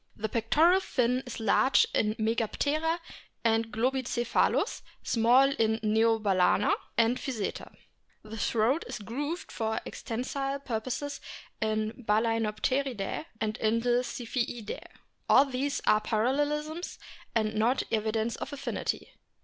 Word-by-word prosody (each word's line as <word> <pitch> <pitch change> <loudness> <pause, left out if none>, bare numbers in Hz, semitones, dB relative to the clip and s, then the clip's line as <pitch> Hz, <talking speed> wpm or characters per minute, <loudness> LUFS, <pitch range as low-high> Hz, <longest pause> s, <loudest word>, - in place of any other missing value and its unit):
The 220 +1 -2
pectoral 305 - +4
fin 250 -7 0
is 245 - -6
large 225 +4 +4
in 215 0 +1
Megaptera 285 +9 0 0.5
and 225 0 +2
Globicephalus, 240 +1 +1 0.2
small 250 +4 +4
in 220 -4 +1
Neobalcena 215 -3 +3 0.2
and 235 +2 +3
Physeter. 230 -7 -4 0.5
The 215 +1 -8
throat 230 +7 +1
is - - -5
grooved 285 - -4
for 220 -1 -1
extensile 275 +4 -4
purposes 255 +5 -3 0.4
in 215 +2 -1
Balaenopteridae 225 +3 0
and 215 0 -1
in 225 +1 +1
the 245 +1 +2
Ziphiidae. 240 -2 -4 0.5
All 270 - +7
these 275 +1 -2
are 215 0 +4
parallelisms, 295 +9 -1 0.4
and 215 -1 +1
not 225 +4 +2
evidence 220 +1 0
of 275 - -6
affinity. 280 -1 -3
230 Hz, 110 wpm, -29 LUFS, 220-270 Hz, 0.5 s, All